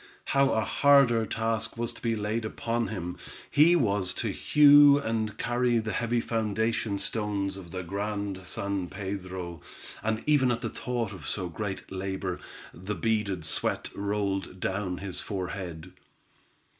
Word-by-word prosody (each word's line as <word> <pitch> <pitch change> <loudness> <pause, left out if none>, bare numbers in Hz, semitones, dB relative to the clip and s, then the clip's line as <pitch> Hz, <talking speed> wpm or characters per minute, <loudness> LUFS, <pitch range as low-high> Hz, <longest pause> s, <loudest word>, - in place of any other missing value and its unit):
How 140 0 +4
a 110 -1 +1
harder 135 -6 +5
task 110 +1 -1
was 120 0 -2
to - - -11
be 115 -1 0
laid 110 +2 -2
upon 115 +2 -2
him. 90 -4 -5 0.3
He 160 +4 +6
was 100 - +1
to - - -2
hew 145 -1 +7
and 110 -5 -2
carry 120 0 +1
the 110 -1 -1
heavy 120 +1 0
foundation 110 -1 0
stones 100 -2 -2
of 95 -3 -10
the 90 +1 -5
Grand 100 +1 -3
San 100 -2 -2
Pedro, 95 -3 -5 0.4
and 110 0 -1
even 145 -4 +4
at 120 0 -1
the 115 - -3
thought 120 -4 -3
of - - -9
so 95 -3 -2
great 95 +2 -5
labor, 95 -1 -3 0.3
the 95 +4 -5
beaded 100 -3 0
sweat - - 0
rolled 100 -2 -2
down 95 -1 -2
his 95 -1 -5
forehead. 90 -3 -5
105 Hz, 145 wpm, -28 LUFS, 95-115 Hz, 0.4 s, hew